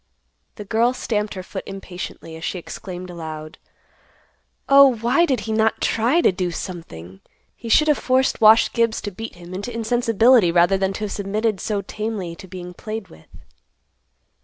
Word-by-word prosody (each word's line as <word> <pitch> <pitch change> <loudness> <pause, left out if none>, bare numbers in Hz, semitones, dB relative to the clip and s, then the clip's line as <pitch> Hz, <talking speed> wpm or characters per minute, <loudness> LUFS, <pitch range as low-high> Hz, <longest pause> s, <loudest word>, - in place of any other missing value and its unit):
The 210 - -8
girl 230 +4 +2
stamped 210 -5 -2
her 185 - -6
foot 190 +1 -7
impatiently, 180 -4 -8
as 160 - -10
she 185 - -3
exclaimed 180 +1 -8
aloud, 155 -2 -8 1.1
"Oh, 275 -2 +7
why 245 +10 +2
did 255 -7 0
he 220 +2 -5
not 220 0 +1
try 245 +10 +2
to - - +4
do 180 -1 -2
something? 95 - -8 0.3
He 230 - -9
should 305 +7 +5
have 300 -2 +3
forced 260 -1 +1
Wash 220 +1 +6
Gibbs 230 -1 +1
to 205 - -5
beat 225 +3 -8
him 175 +1 -11
into 200 +6 -5
insensibility 230 -2 +3
rather 175 +3 +4
than 190 0 0
to - - -7
have 205 - -3
submitted 210 +1 -1
so 205 0 -2
tamely 210 -4 -4
to 190 - -11
being 180 0 -8
played 215 +2 -7
with." 80 - -17
210 Hz, 170 wpm, -21 LUFS, 180-230 Hz, 1.1 s, Oh